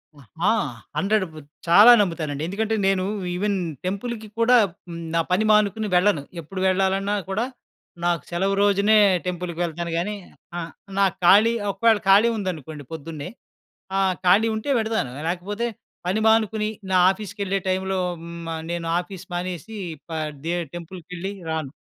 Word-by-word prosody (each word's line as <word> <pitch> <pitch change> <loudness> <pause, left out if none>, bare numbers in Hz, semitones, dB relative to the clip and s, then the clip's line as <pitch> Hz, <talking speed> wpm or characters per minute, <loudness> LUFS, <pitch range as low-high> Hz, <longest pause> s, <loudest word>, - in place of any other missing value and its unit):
అ! - - -17 0.3
ఆ! - - +5 0.5
హండ్రెడు 200 +3 +2 0.4
చాలా 210 +8 +9
నమ్ముతానండి. 155 -6 -2
ఎందుకంటే 220 +3 -1
నేను 190 -1 +2 0.3
ఈవెన్ 200 +1 0 0.3
టెంపుల్‌కి 215 +3 -4
కూడా, 245 +2 +6 0.3
హ్మ్, 170 0 -6
నా 165 - +4
పని 205 +4 +3
మానుకుని 210 0 +2
వెళ్ళను. 180 -5 +3 0.2
ఎప్పుడు 185 +5 -7
వెళ్లాలన్నా 195 +2 +1
కూడా 215 +5 0 0.6
నాకు 170 -4 +1
సెలవు 195 +3 +1
రోజునే 205 +2 +4 0.3
టెంపుల్‌కి 175 -1 -4
వెళ్తాను 170 0 -3
కానీ, 205 +5 -1 0.4
ఆహ్, 165 0 -6 0.3
నాకు 195 -2 +3
ఖాళీ 215 +6 +7 0.2
ఒకవేళ 220 +2 +3
ఖాళీ 210 +4 +7
ఉందనుకోండి 160 -6 -5
పొద్దున్నే. 160 +1 -6 0.7
ఆ! - - +3 0.3
ఖాళీ 210 +5 +5
ఉంటే 220 +6 -4
వెళతాను. 220 - -1 0.2
లేకపోతే, 205 +6 -2 0.4
పని 200 +4 +1
మానుకుని, 220 -1 +2 0.2
నా 185 - +4
ఆఫీస్‌కెళ్ళే 195 -1 -3
టైమ్‌లో 190 0 0 0.2
హ్మ్. 170 0 -8
ఆహ్, 160 - -6
నేను 170 -1 -3
ఆఫీస్ 185 0 -8
మానేసి 180 +4 -4 0.3
పదే 155 +1 -3 0.2
టెంపుల్‌కెళ్లి 180 +2 -7 0.2
రాను. 155 -4 -3
190 Hz, 135 wpm, -23 LUFS, 170-210 Hz, 0.7 s, చాలా